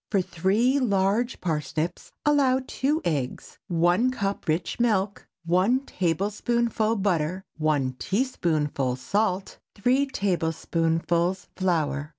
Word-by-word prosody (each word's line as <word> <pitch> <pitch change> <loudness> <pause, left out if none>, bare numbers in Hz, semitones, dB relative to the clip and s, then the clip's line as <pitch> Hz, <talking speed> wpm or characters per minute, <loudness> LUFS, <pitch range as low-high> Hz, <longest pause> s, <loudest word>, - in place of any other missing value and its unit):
For 200 - +2
three 195 - +1
large 210 +1 +1
parsnips 155 +1 -2
allow 275 -3 +3
two 295 +6 -1
eggs, 140 -6 -3
one 175 +8 +3
cup 200 -6 -3
rich 165 +7 -1
milk, 205 -4 0 0.2
one 185 +10 +3
tablespoonful 215 - 0
butter, 185 -3 0 0.2
one 140 -5 +1
teaspoonful 155 - 0
salt, 190 +8 -1 0.2
three 255 +7 +2
tablespoonfuls 170 -3 0
flour. 155 -5 0
190 Hz, 100 wpm, -26 LUFS, 165-230 Hz, 0.2 s, allow